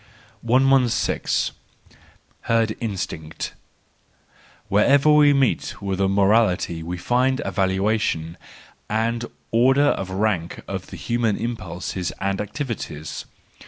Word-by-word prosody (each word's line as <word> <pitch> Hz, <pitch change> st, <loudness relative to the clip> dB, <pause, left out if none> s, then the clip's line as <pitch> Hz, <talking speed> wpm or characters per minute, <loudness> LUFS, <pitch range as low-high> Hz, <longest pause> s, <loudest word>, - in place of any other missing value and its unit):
Herd 115 Hz, -1 st, +1 dB
Instinct. 90 Hz, -7 st, -4 dB, 0.6 s
— -, -, -31 dB
Wherever 140 Hz, +9 st, +4 dB
we 150 Hz, -1 st, +6 dB
meet 135 Hz, -3 st, +1 dB
with 100 Hz, -1 st, -2 dB
a 95 Hz, -, +3 dB
morality 100 Hz, -4 st, +2 dB
we 85 Hz, +2 st, -4 dB
find 125 Hz, +7 st, +1 dB
a -, -, -2 dB
valuation 95 Hz, -4 st, 0 dB, 0.5 s
and 115 Hz, +2 st, 0 dB, 0.3 s
order 135 Hz, +5 st, +4 dB
of 95 Hz, -, -2 dB
rank 95 Hz, -3 st, -1 dB
of -, -, -5 dB
the -, -, -9 dB
human 115 Hz, -3 st, 0 dB
impulses 95 Hz, -6 st, -4 dB
and 100 Hz, 0 st, -1 dB
activities. 105 Hz, -, -5 dB
105 Hz, 100 wpm, -23 LUFS, 95-120 Hz, 0.6 s, we